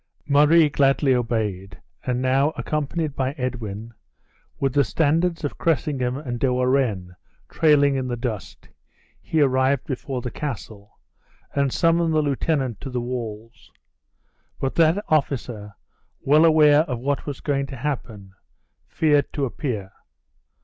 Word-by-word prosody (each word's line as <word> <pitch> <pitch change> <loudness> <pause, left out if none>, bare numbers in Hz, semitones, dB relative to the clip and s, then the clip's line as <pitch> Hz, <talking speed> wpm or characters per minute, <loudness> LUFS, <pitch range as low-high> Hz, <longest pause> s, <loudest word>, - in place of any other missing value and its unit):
Murray 150 +3 +5
gladly 135 -1 +2
obeyed, 105 -6 -2 0.2
and 125 0 -1
now, 135 +4 +2
accompanied 150 0 -2
by 130 0 -1
Edwin, 115 -5 -5 0.7
with 135 -2 0
the 145 - +4
standards 165 - 0
of 145 - -4
Cressingham 135 -4 0
and 125 -5 -5
De 130 0 +1
Warenne 125 -8 0 0.3
trailing 145 -3 +4
in 130 -1 -2
the 120 -1 -3
dust, 115 -6 -6 0.5
he 160 - 0
arrived 130 0 +2
before 130 -1 -4
the 125 - -4
castle, 110 -8 -7 0.6
and 140 -2 +1
summoned 165 0 +2
the 155 - +3
lieutenant 135 -4 -1
to 135 - -6
the 125 -1 -2
walls. 115 -2 -6 0.9
But 135 - -2
that 170 +5 +2
officer, 120 -9 -1 0.5
well 150 +4 +5
aware 150 -2 +6
of 150 -6 -1
what 140 +5 -2
was 140 -3 -5
going 140 -2 -1
to 135 - -8
happen, 115 -7 -5 0.5
feared 150 -3 +1
to 140 -3 -1
appear. 115 -7 -4
135 Hz, 135 wpm, -23 LUFS, 120-150 Hz, 0.9 s, aware